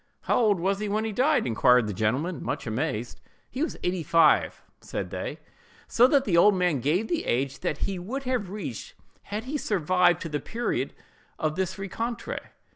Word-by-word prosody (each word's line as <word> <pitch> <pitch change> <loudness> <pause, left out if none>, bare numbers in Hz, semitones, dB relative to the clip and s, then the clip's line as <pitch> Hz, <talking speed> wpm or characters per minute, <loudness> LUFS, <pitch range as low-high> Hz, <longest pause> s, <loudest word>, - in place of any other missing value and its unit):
"How - - +1
old 210 -6 +3
was 195 +3 0
he 210 -1 -2
when 215 +2 0
he 220 - -2
died?" 275 +8 +2
inquired 125 0 +4
the 105 - -3
gentleman, 130 - -1
much 140 +4 -3
amazed. 115 0 -3 0.3
"He 260 - -4
was 320 - -1
eighty 180 0 0
five," 160 0 +3 0.2
said - - -5
they: - - -4 0.5
so 245 +2 +5
that 275 0 +3
the 185 - +1
old 200 +4 +6
man 180 -6 +1
gave 165 - +1
the 340 - -1
age 135 +3 -1
that 150 - -2
he 195 -2 -3
would 250 +10 -5
have 250 -7 -1
reached 170 - -6 0.3
had 210 +2 -4
he 275 +5 -3
survived 180 - +2
to 165 - -5
the 150 -1 -2
period 235 - -3 0.4
of 155 -1 -1
this 190 +1 -2
rencontre. 225 +5 -4
185 Hz, 190 wpm, -26 LUFS, 150-220 Hz, 0.5 s, old